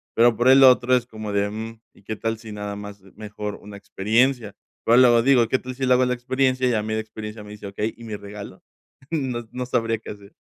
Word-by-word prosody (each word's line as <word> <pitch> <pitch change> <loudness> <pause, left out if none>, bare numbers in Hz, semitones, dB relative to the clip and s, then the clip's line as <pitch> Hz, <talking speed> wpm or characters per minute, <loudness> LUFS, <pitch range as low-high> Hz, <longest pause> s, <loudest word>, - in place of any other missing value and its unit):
pero 120 0 +5
por 120 - +2
el 135 +1 +7
otro 125 -1 +6
es 125 -1 0
como 110 -3 -7
de, 100 0 +1
mm: 110 +1 -7
"¿Y - - -23
qué 110 +2 -5
tal 115 +1 -3
si 110 -1 -11
nada 105 0 -5
más, 105 -1 -9 0.2
mejor 105 -1 -6
una 105 0 -12
experiencia?". 110 +2 0 0.3
Pero 115 - +5
luego 120 -2 +6
digo: 125 -3 +4
"¿Qué 130 - +1
tal 130 0 -8
si 135 +1 -2
le 125 - +4
hago 125 0 +3
la 125 - 0
experiencia?". 130 +1 0
Y - - +1
a 110 -2 0
mí 110 +1 -3
de 110 - -1
experiencia 110 0 -9
me 105 - -11
dice: 105 -1 -9
"Okey, 105 +3 -3
¿y 115 - -13
mi 110 - -5
regalo?". 100 0 -10 0.5
No, 130 -7 -2
no 125 0 -4
sabría 115 -2 0
qué - - -9
hacer. 100 0 -13
115 Hz, 245 wpm, -23 LUFS, 105-125 Hz, 0.5 s, el